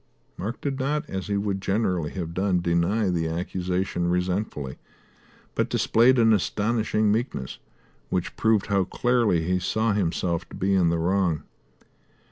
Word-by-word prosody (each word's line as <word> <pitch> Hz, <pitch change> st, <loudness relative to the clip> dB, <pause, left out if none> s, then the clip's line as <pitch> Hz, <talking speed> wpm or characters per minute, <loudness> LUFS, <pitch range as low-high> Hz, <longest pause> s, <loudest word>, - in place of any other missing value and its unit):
Mark 110 Hz, +6 st, -5 dB
did 140 Hz, -1 st, -2 dB
not, 145 Hz, +3 st, -1 dB
as 95 Hz, -1 st, -4 dB
he 100 Hz, -1 st, 0 dB
would 100 Hz, -1 st, -2 dB
generally 95 Hz, -6 st, 0 dB
have 85 Hz, -2 st, -5 dB
done, 95 Hz, 0 st, +1 dB
deny 85 Hz, +4 st, +1 dB
the 85 Hz, -2 st, 0 dB
accusation 90 Hz, +1 st, -2 dB
resentfully, 90 Hz, -6 st, -2 dB, 0.7 s
but -, -, 0 dB
displayed 125 Hz, +3 st, +4 dB
an 115 Hz, -2 st, +5 dB
astonishing 110 Hz, +1 st, +1 dB
meekness, 110 Hz, -, -2 dB, 0.5 s
which 90 Hz, -2 st, -2 dB
proved 110 Hz, -3 st, +2 dB
how 100 Hz, -2 st, +2 dB
clearly 115 Hz, -4 st, +1 dB
he 90 Hz, +2 st, +1 dB
saw 110 Hz, +4 st, 0 dB
himself 85 Hz, -3 st, -1 dB
to -, -, -10 dB
be 100 Hz, +1 st, 0 dB
in 90 Hz, -3 st, +4 dB
the 85 Hz, -, +1 dB
wrong. 85 Hz, -1 st, +1 dB
95 Hz, 145 wpm, -25 LUFS, 85-110 Hz, 0.7 s, an